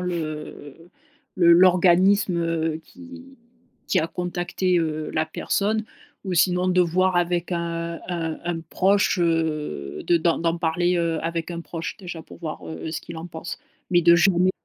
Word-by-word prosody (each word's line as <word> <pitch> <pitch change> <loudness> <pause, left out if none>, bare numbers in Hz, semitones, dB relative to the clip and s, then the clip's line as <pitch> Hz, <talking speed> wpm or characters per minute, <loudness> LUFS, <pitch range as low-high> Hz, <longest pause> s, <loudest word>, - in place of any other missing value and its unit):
le, 180 0 -2
heu, 155 0 -7 0.5
le 170 -2 +6
l'organisme, 185 +1 +5
heu, 165 -1 -1
qui 265 +3 -13 0.5
qui - - +2
a 160 - -1
contacté, 180 +1 -1
heu, 155 -2 -2
la 155 0 0
personne 210 +6 -1 0.4
ou 185 -2 -2
sinon 180 +1 +3
de 180 0 +3
voir 180 +1 +2
avec 175 0 0
un 170 -1 -3
un 165 -3 -3
un 170 -1 -2
proche, 195 +2 +2
heu, 155 - -1
de 175 - +4
d'en 165 0 +1
d'en 170 0 0
parler, 175 +2 +1
heu, 165 -1 0
avec 165 0 -3
un 170 -1 -5
proche 165 -1 -6
déjà 175 -4 -8
pour - - -14
voir, 160 -3 -6
heu, 160 0 -6
ce 160 - -4
qu'il 170 - -9
en 160 +1 -6
pense. 165 0 -7 0.3
Mais 175 -1 +4
de 170 +1 +7
jamais 180 +1 +4
170 Hz, 170 wpm, -23 LUFS, 165-180 Hz, 0.5 s, de